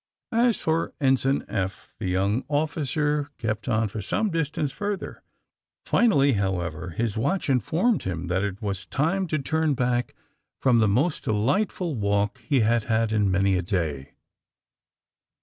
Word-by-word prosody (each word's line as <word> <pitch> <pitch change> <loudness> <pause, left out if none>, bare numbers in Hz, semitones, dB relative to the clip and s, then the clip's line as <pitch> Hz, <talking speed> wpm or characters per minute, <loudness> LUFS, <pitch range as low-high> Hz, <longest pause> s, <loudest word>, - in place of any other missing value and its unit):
' - - -68
' - - -65 0.2
As 235 - +2
for 160 +1 -1
Ensign 135 0 +2
Eph, 95 -1 -4
that 105 - -3
young 100 +6 +1
officer 150 0 0
kept 110 +1 -3
on 110 -1 +2
for 105 +1 -5
some 205 - 0
distance 150 -3 -1
further. 205 +6 -4 0.6
Finally, 140 - +4
how 95 -3 0
ever, 85 +1 -5
his 110 +5 -2
watch 180 +4 0
informed 165 - +1
him 90 -2 -4
that 90 +3 0
it 100 0 -4
was 100 -3 -3
time 165 - 0
to 155 - 0
turn 155 +1 0
back 125 -1 0 0.4
from 125 -3 +4
the 110 - +4
most 140 - +1
delightful 150 - 0
walk 100 0 0
he 130 +2 +1
had 115 0 +2
had 110 -1 +1
in 105 -2 +2
many 95 +1 +2
a 90 - +1
day. 80 -7 -2
115 Hz, 160 wpm, -25 LUFS, 100-150 Hz, 0.6 s, Finally